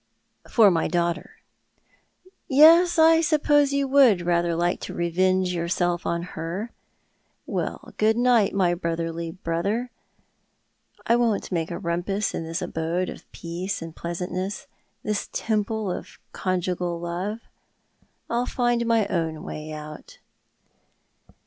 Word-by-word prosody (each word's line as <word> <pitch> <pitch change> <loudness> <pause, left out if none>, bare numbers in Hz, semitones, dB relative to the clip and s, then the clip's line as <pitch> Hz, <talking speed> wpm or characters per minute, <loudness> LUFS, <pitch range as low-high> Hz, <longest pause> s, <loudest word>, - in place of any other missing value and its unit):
"For 215 -4 +6
my 165 -2 +1
daughter. 170 0 -1 1.1
Yes, 330 +5 +6
I 325 0 +6
suppose 295 -2 +3
you 280 0 +1
would 260 -9 +5
rather 170 -1 +1
like 175 +1 0
to - - -7
revenge 185 +2 +1
yourself 175 0 -1
on 170 0 -1
her. 175 +8 -4 0.7
Well, - - -4
good 220 +1 +3
night, 240 -4 +4
my 180 -3 +3
brotherly 165 -1 -3
brother. 195 +8 -2 1.1
I 235 - +4
won't 230 -5 0
make 165 -2 -1
a 170 - -4
rumpus 190 +3 -2
in 165 - -4
this 165 +1 -3
abode 165 +3 -2
of - - -11
peace 180 +4 -4
and 165 -1 -8
pleasantness, 180 +8 -4 0.4
this 210 -1 -2
temple 215 -2 -1
of - - -7
conjugal 180 -2 -2
love. 180 +6 -4 0.9
I'll 240 +1 -1
find 240 -1 0
my 225 -2 +3
own 165 -4 -1
M 155 - -10
ay 155 0 -6
out." 150 0 -9
185 Hz, 125 wpm, -24 LUFS, 170-230 Hz, 1.1 s, For